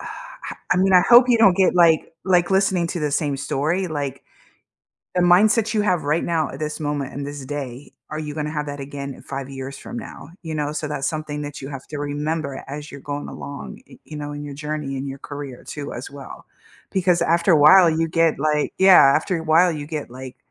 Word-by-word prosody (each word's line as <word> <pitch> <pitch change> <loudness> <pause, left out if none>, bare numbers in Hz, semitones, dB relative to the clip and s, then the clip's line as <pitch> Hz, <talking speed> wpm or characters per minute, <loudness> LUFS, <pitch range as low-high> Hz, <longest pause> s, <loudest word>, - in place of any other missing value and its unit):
I - - -9 0.2
I - - +1
mean, 190 +1 +3
I 180 - +8
hope 245 +1 +8
you 240 -2 +4
don't 195 -5 +5
get 190 -2 +3
like 170 -3 +4
like 180 -1 +3
listening 190 -3 +2
to 175 - -4
the 150 -1 -1
same 145 -1 0
story 160 +7 -1
like. 140 -3 -4 0.9
The 180 - +2
mindset 215 +5 +4
you 215 - +1
have 180 -5 +1
right 150 +3 0
now 160 -3 0
at 135 - -9
this 150 0 -4
moment 145 -3 -3
in 140 - -4
this 145 -1 -7
day, 135 -2 -6 0.2
are 155 - -4
you 150 -1 -5
gonna 150 -1 -3
have 150 -1 -3
that 145 0 -6
again 140 0 -6
in - - -15
5 135 -1 -6
years 135 0 -7
from 240 - -7
now, 230 - -9
you 160 -2 -5
know, 150 -1 -2
so 155 0 -3
that's 140 -2 -2
something 155 -2 -4
that 145 -1 -7
you 135 - -6
have 135 -2 -8
to 150 - -7
remember 145 0 -3
as 145 +2 -7
you're 140 - -9
going 145 +1 -5
along, 140 0 -8
y - - -15
you 155 - -11
know, 145 0 -5
in 145 0 -6
your 145 - -7
journey 150 -1 -4
in 135 - -4
your 135 0 -6
career 140 -2 -8
too 145 -1 -6
as 120 - -7
well, 140 -2 -11 0.5
because 180 -2 +2
after 170 +2 +3
a - - +6
while 170 +5 +8
you 165 0 0
get 165 -1 +2
like 150 0 0
Yeah, 190 -1 +8 0.2
after 170 +3 -1
a - - -6
while 165 +3 +4
you 150 -2 -6
get 150 -4 -5
like 130 +1 -9
150 Hz, 230 wpm, -22 LUFS, 140-170 Hz, 0.9 s, I